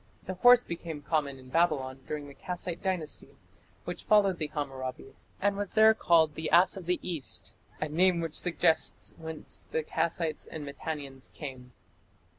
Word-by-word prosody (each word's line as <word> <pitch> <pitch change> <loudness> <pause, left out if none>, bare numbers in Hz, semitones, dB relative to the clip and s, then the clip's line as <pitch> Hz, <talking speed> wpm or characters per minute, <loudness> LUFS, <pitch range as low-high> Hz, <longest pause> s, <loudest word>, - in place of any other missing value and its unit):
The 185 - -3
horse 245 +6 +7
became 165 -3 -6
common 140 -3 0
in 130 -1 -14
Babylon 135 -4 +1
during 150 -1 -4
the 140 - -11
Kassite 175 +1 -5
Dynasty, 180 -6 -3 0.5
which - - -5
followed 200 -4 +4
the 155 - -1
Hammurabi, 135 -4 -5 0.3
and 200 +1 +2
was 200 -1 -4
there 220 0 +7
called 165 -7 +4
"the 160 +2 -3
ass 175 +3 +5
of 185 -3 -8
the 180 - +1
east", 165 -6 -4 0.3
a 155 - -1
name 175 +3 +3
which 165 -2 -3
suggests 165 -2 +2
whence 160 -1 -6
the 160 - -1
Kassites 165 0 -1
and 155 -2 -7
Mitannians 140 -2 -6
came. 130 -4 -8
160 Hz, 160 wpm, -30 LUFS, 145-180 Hz, 0.5 s, horse